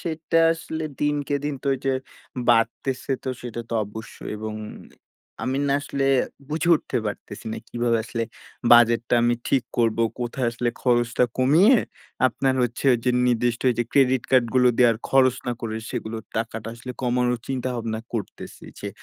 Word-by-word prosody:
সেটা 165 Hz, 0 st, -1 dB
আসলে 160 Hz, -1 st, -5 dB, 0.2 s
দিনকে 145 Hz, -1 st, 0 dB
দিন 145 Hz, -1 st, -1 dB
তো 140 Hz, -, -1 dB
এই -, -, -6 dB
যে 135 Hz, -, +3 dB, 0.6 s
বাড়তেছে। 120 Hz, +3 st, +1 dB
তো 130 Hz, -, -5 dB
সেটা 120 Hz, -1 st, -5 dB
তো -, -, -7 dB
অবশ্যই 110 Hz, +1 st, -9 dB
এবং 110 Hz, 0 st, -5 dB, 0.9 s
আমি 130 Hz, +2 st, -1 dB
না -, -, +2 dB
আসলে 140 Hz, -1 st, -2 dB, 0.4 s
বুঝে 160 Hz, +3 st, -1 dB
উঠতে 150 Hz, -, -2 dB
পারতেছি 105 Hz, +1 st, -7 dB
না। -, -, -4 dB
কিভাবে 120 Hz, -1 st, +1 dB
আসলে 115 Hz, 0 st, -3 dB, 0.5 s
budget 120 Hz, -1 st, +7 dB
টা -, -, +3 dB
আমি 120 Hz, 0 st, +3 dB
ঠিক 135 Hz, -3 st, +2 dB, 0.2 s
করবো। 115 Hz, -1 st, +2 dB, 0.2 s
কোথায় 120 Hz, +1 st, -2 dB
আসলে 120 Hz, +1 st, -2 dB
খরচটা 120 Hz, 0 st, +2 dB
কমিয়ে 170 Hz, -, +6 dB, 0.5 s
আপনার 130 Hz, +1 st, 0 dB
হচ্ছে 120 Hz, +3 st, -2 dB, 0.2 s
যে 125 Hz, -, +3 dB, 0.2 s
নির্দিষ্ট 120 Hz, 0 st, +1 dB, 0.2 s
যে -, -, +3 dB
credit 130 Hz, -3 st, +4 dB
card 130 Hz, -2 st, +5 dB
গুলো 125 Hz, -1 st, +5 dB
দেয়ার 120 Hz, -3 st, +5 dB
খরচ 130 Hz, -2 st, +4 dB
না 120 Hz, -, 0 dB
করে 110 Hz, -1 st, -3 dB
সেগুলোর 110 Hz, 0 st, -5 dB
টাকাটা 115 Hz, 0 st, -3 dB
আসলে 125 Hz, +2 st, -8 dB
কমানোর 125 Hz, -1 st, +1 dB
চিন্তাভাবনা 120 Hz, -4 st, -2 dB
করতেছি। 110 Hz, -4 st, -6 dB, 0.2 s
যে 100 Hz, -, -4 dB
120 Hz, 160 wpm, -24 LUFS, 115-135 Hz, 0.9 s, budget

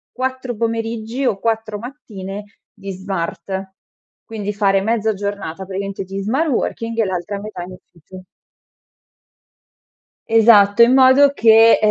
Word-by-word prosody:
4 260 Hz, -1 st, -3 dB
pomeriggi 230 Hz, +2 st, -3 dB
o 200 Hz, -6 st, 0 dB
4 220 Hz, -1 st, -2 dB
mattine 205 Hz, -6 st, -8 dB, 0.3 s
di 200 Hz, -2 st, -8 dB
smart; 190 Hz, 0 st, -5 dB, 0.5 s
quindi 210 Hz, -2 st, -5 dB
fare 195 Hz, -1 st, +2 dB
mezza 220 Hz, 0 st, 0 dB
giornata 195 Hz, -3 st, -5 dB
praticamente 195 Hz, 0 st, -5 dB
di 195 Hz, +1 st, -6 dB
smart 270 Hz, +10 st, 0 dB
working 230 Hz, -2 st, -2 dB
e 220 Hz, -, +3 dB
l'altra 190 Hz, +2 st, -4 dB
metà 205 Hz, -3 st, -7 dB
in 180 Hz, -, -10 dB
ufficio. 180 Hz, +1 st, -15 dB, 2.1 s
Esatto, 225 Hz, -1 st, +5 dB
in 240 Hz, +2 st, +6 dB
modo 265 Hz, +2 st, +6 dB
che 225 Hz, -2 st, +6 dB
210 Hz, 120 wpm, -19 LUFS, 195-230 Hz, 2.1 s, in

